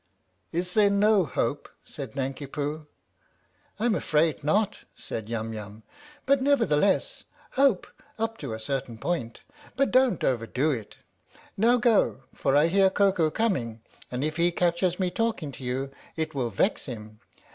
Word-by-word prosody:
" - - -45
Is 180 +2 -2
there 210 -2 +5
no 200 -1 +4
hope?" 140 0 -2 0.2
said 135 -7 -8
Nanki 135 +1 -3
Poo. 150 +2 -4 0.5
" 90 - -36
I'm 230 +1 +2
afraid 155 -5 +1
not," 205 +7 +1 0.2
said 110 -1 -6
Yum 115 -1 -3
Yum. 105 0 -8 0.2
" 295 0 -22
But, 275 0 +3
never 280 -3 +3
theless, 185 +5 +1 0.3
hope 270 -8 +3 0.3
up 225 0 -2
to 135 -6 -5
a 110 - -4
certain 125 -1 -3
point, 120 -5 -3 0.3
but 275 +2 +2
don't 255 -1 +3
overdo 130 +4 +1
it. 115 -7 -5 0.6
Now 235 +5 +4
go, 230 - +2
for 135 - +1
I 145 +2 +6
hear 190 +3 +4
Koko 190 -5 +2
coming, 135 - -1 0.3
and 125 +2 -3
if 155 +1 -2
he 170 +1 +3
catches 175 +1 +1
me 185 -1 0
talking 220 -10 -1
to 135 - -11
you 130 +2 -2 0.2
it 160 0 -2
will 130 -4 -1
vex 135 - 0
him. 110 -3 -8
155 Hz, 165 wpm, -27 LUFS, 125-205 Hz, 0.6 s, I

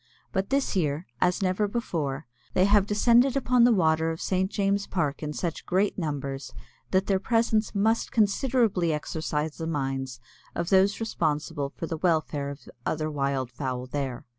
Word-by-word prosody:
But 190 +1 -1
this 275 -4 0
year, 155 -2 0 0.2
as 180 +3 +2
never 185 +3 +1
before, 160 - -3 0.3
they 185 - +5
have 205 0 +4
descended 240 +5 +4
upon 250 -2 +4
the 245 - +5
water 160 -5 +3
of 165 0 -4
St. 190 0 0
James 200 -1 0
Park 150 -6 -1
in 150 -1 -3
such 165 +2 -3
great 195 +3 +1
numbers 140 -5 -4 0.4
that 190 0 +2
their 195 -2 +1
presence 225 0 +1
must 220 +3 +1
considerably 215 - +2
exercise 150 0 -3
the 160 - -4
minds 135 -4 -3 0.4
of 170 0 -2
those 195 +1 +4
responsible 150 -9 -1
for 165 - -6
the 165 0 -4
welfare 155 -4 0
of 140 0 -9
the - - -15
other 155 +3 -1
wild 140 -3 -1
fowl 125 0 -4
there. 130 -2 -4
170 Hz, 165 wpm, -27 LUFS, 145-205 Hz, 0.4 s, they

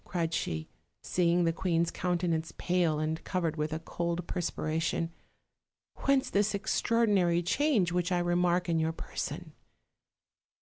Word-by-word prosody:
cried 170 -3 -2
she, 80 - -2 0.4
seeing 175 0 +2
the 165 -1 +2
queen's 170 -1 0
countenance 170 -2 -1
pale 175 -4 +1
and 155 +1 -2
covered 170 -4 -1
with 150 0 -2
a 155 - -1
cold 170 +1 -3
perspiration; 165 -1 -1 0.9
"whence 275 0 +3
this 205 +1 +2
extraordinary 200 -4 +2
change 215 - +2
which 180 +1 0
I 180 - +3
remark 175 0 +2
in 165 -1 +1
your 160 0 0
person?" - - -5
175 Hz, 130 wpm, -30 LUFS, 165-180 Hz, 0.9 s, whence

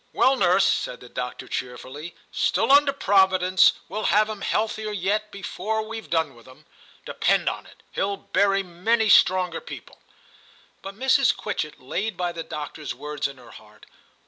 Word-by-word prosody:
'Well, 265 - +4
nurse,' 190 -4 +3
said 125 - -1
the 125 - -13
doctor 125 0 -6
cheerfully, 130 +6 -6 0.2
'still - - +1
under 285 0 +6
Providence, 190 -6 +4
we'll 210 +4 -4
have 215 +1 +3
him 215 -2 -6
healthier 215 +1 -1
yet 210 +2 -1
before 210 +2 -3
we've 225 0 -8
.done 160 -4 0
with 120 0 -18
him; 130 - -17 0.4
depend - - +1
on - - -2
it, - - -19
he'll 200 0 -1
bury 200 0 +1
many 215 +6 0
stronger 180 -3 +4
people.' - - -11 0.8
But 195 +1 -9
Mrs. 265 +1 +3
Quitchett 150 -7 -4
laid 180 +10 -3
by 175 -1 -1
the 170 -1 -6
doctor's 150 -1 -6
words 150 -1 -3
in 140 -1 -11
her 120 -2 -15
heart. 105 0 -16
190 Hz, 160 wpm, -24 LUFS, 150-215 Hz, 0.8 s, under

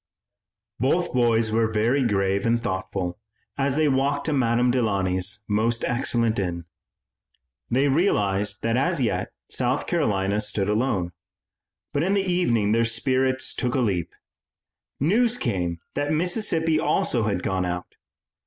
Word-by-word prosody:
Both 155 +9 +1
boys 115 -3 +2
were 110 0 +1
very 115 +6 +2
grave 100 -3 +1
and 115 +1 +2
thoughtful 95 -3 -3 0.4
as 135 -1 0
they 155 0 +2
walked 140 +1 +1
to 155 - 0
Madame 120 -2 +2
Delaunay's 100 -4 0
most 110 +3 0
excellent 120 -3 0
inn. 85 -3 -3 1.0
They 135 +4 +2
realized 105 - +1
that 115 +1 +1
as 135 - +1
yet 120 -4 -1 0.2
South - - 0
Carolina 100 0 0
stood 105 -1 -1
alone, 105 -5 0 0.8
but 145 - +1
in 190 +5 +1
the 195 -1 +1
evening 120 - +1
their 115 +1 +3
spirits 130 +3 0
took 125 -2 -2
a - - +2
leap. 90 -8 -1 0.8
News 225 - +2
came 90 - -2 0.2
that 145 +1 -1
Mississippi 165 -1 +1
also 120 -7 +1
had 100 -4 -1
gone 95 -1 0
out. 90 0 -4
115 Hz, 135 wpm, -24 LUFS, 100-135 Hz, 1.0 s, their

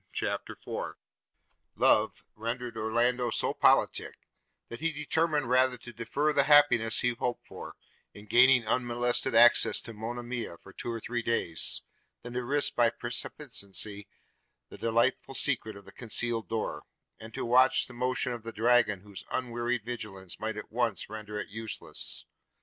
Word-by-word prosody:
CHAPTER - - -3
IV - - -6 0.8
LOVE - - +2
rendered 115 +2 -4
Orlando 120 +3 +1
so - - -1
politic, - - +2 0.5
that 120 - -8
he 165 +2 0
determined 150 -1 0
rather 130 0 +3
to 120 0 -12
defer 135 +7 -1
the 140 -2 +3
happiness 130 -7 +5
he 125 - +2
hoped 120 0 -3
for, - - -10 0.4
in 105 - -13
gaining 125 +2 +5
unmolested 120 0 +1
access 120 +1 +6
to 115 - -9
Monimia 120 -2 -5
for 95 - -16
two 120 - -5
or 115 - -4
three 120 +2 -3
days, 115 -9 +1 0.4
than 120 0 -8
to 125 0 -2
risk 145 +4 +1
by 120 -1 +4
precipitancy 110 -4 -3 0.6
the - - -11
delightful 115 +4 0
secret 115 -7 0
of 100 - -13
the - - -13
concealed 115 -1 -2
door, 110 -1 -3 0.4
and 110 0 -10
to - - -3
watch 130 +2 +4
the 125 - -10
motion 125 0 -1
of 120 - -6
the 115 +1 -7
dragon 115 -3 +2
whose 100 -1 -10
unwearied 120 -2 -2
vigilance 105 -6 -7
might 110 0 -3
at 105 - -8
once 115 -3 -1
render 105 -1 -6
it 105 - -6
useless. 110 +1 -6
120 Hz, 155 wpm, -29 LUFS, 110-125 Hz, 0.8 s, access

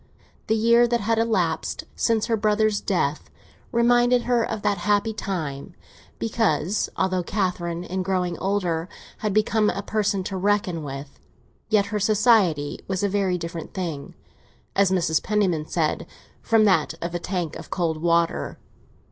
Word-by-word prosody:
The 220 - +2
year 235 +2 +5
that 235 0 0
had 225 +2 +1
elapsed 230 0 0
since 225 -2 +1
her 230 - +1
brother's 215 0 +1
death 155 -7 -1 0.4
reminded 240 0 +3
her—of 230 -3 0
that 205 -3 +1
happy 205 +4 +1
time, 175 -5 -4 0.4
because, 210 -4 0
although 185 -1 +1
Catherine, 175 -3 -2
in 185 +1 -3
growing 180 -2 -1
older, 180 -4 -1 0.3
had 215 - -1
become 215 +1 +2
a 200 - -3
person 205 -2 0
to 190 - -4
be - - -5
reckoned 195 -5 +1
with, 140 0 -8 0.5
yet 210 -2 +3
her 210 - +1
society 205 -8 +3
was 190 0 -2
a 200 - +2
very 190 -2 +1
different 165 0 -7
thing, 165 -7 -4 0.6
as 200 -1 +4
Mrs. 170 -4 +1
Penniman 185 -7 0
said, 160 -3 -1 0.3
from 225 -1 +3
that 165 -5 +2
of 170 0 -4
a 175 - -1
tank 175 -3 -3
of - - -9
cold 160 -3 -1
water. 170 0 +1
195 Hz, 150 wpm, -24 LUFS, 170-215 Hz, 0.6 s, year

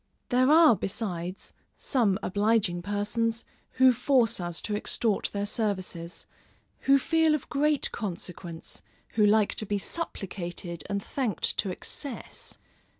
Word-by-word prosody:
There 255 +2 +3
are 315 -5 +7
besides, 185 -3 -4 0.2
some 220 -8 +1
obliging 205 -3 +1
persons, 210 +4 -1 0.3
who 260 -1 +6
force 245 -2 +2
us 175 -1 -1
to 210 - -2
extort 215 0 0
their 200 0 -2
services, 185 -6 -3 0.6
who 275 - +8
feel 320 +2 +3
of 300 - -5
great 295 +1 +1
consequence, 175 -4 -6 0.3
who 215 - +1
like 210 0 +4
to 215 - +1
be 205 - 0
supplicated 175 - -4
and 200 -1 -2
thanked 250 -9 -1
to 200 - +1
excess. 250 +8 -6
210 Hz, 125 wpm, -28 LUFS, 185-250 Hz, 0.6 s, who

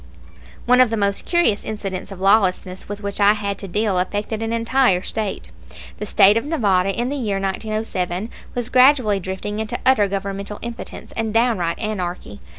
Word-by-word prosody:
One 250 +1 +5
of 255 - +5
the 225 - -1
most 200 -1 0
curious 345 - +2
incidents 195 -3 -5
of 195 - -8
lawlessness 190 -2 +1
with 205 0 -6
which 200 0 -4
I 205 +1 +6
had 200 -2 -4
to 195 - -6
deal 205 0 0
affected 205 +4 -2
an 225 0 -2
entire 230 -4 +2
State. 215 -3 -4 0.5
The 210 - -4
State 205 +2 +5
of 230 - 0
Nevada 195 - +2
in 240 +5 -1
the 285 - -2
year 210 -8 -1
1907 195 -1 -3 0.2
was 245 -1 -2
gradually 255 -6 +4
drifting 190 +3 -5
into 220 +2 -3
utter 235 -6 +4
governmental 200 +1 -4
impotence 235 0 -7
and 225 -1 -3
downright 225 -7 +1
anarchy. 180 - -4
210 Hz, 170 wpm, -21 LUFS, 195-230 Hz, 0.5 s, I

